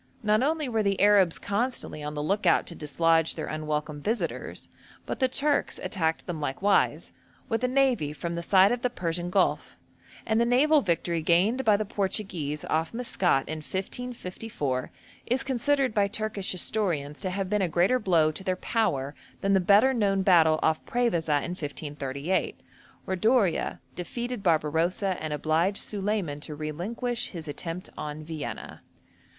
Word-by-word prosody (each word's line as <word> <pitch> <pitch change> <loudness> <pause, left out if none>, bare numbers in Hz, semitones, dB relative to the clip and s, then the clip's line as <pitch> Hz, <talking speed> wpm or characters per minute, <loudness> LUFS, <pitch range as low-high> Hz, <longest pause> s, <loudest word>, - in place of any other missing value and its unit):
Not 215 +1 +3
only 305 +1 0
were 225 -3 0
the 200 -2 0
Arabs 200 -4 +5
constantly 205 -6 -2
on 150 0 -5
the 150 - -2
look 195 +4 0
out 170 - +4
to - - -6
dislodge 165 +1 +1
their 155 - -4
unwelcome 150 -1 -3
visitors, 225 +9 -3 0.4
but - - -4
the 260 - +3
Turks 285 +3 +1
attacked 165 -5 -1
them 165 -4 -5
likewise, 185 +9 +1 0.4
with 225 +2 -1
a - - +3
navy 255 - +2
from 170 +4 -5
the 170 - -3
side 190 +3 +5
of 245 0 -1
the 250 - +1
Persian 175 -5 -3
Gulf, - - 0 0.5
and 225 0 +2
the - - +5
naval 290 +5 +4
victory 170 -4 0
gained 190 +11 +2
by 215 -3 +4
the 215 - -2
Portuguese 190 -7 -2
off 160 +6 -1
Maskat 185 - +1
in 155 - -4
1554 185 - -4 0.4
is 250 +3 +1
considered 270 -1 +1
by 205 -1 +3
Turkish 210 -2 -1
historians 170 -7 -1
to 185 - -1
have 190 +1 -2
been 210 +1 0
a 185 - +1
greater 180 +10 +3
blow 165 -7 +3
to 175 - -6
their 185 -1 0
power 145 - -1 0.3
than 195 0 +2
the 195 - +5
better 205 +8 +5
known 200 -5 +1
battle 160 -4 +5
off 160 0 +1
Prevesa 170 - +1
in 175 - -4
1538, 145 -1 -3 0.5
when 190 -1 -2
D'Oria 220 -4 +2
defeated 240 +6 -5
Barbarossa 170 +3 +1
and 155 - -4
obliged 160 +6 +1
Solyman 200 -7 -2
to 150 0 -7
relinquish 215 - -3
his 165 -4 -8
attempt 165 +4 -6
on 150 +1 -6
Vienna. 155 -2 -6
185 Hz, 160 wpm, -27 LUFS, 155-220 Hz, 0.5 s, Arabs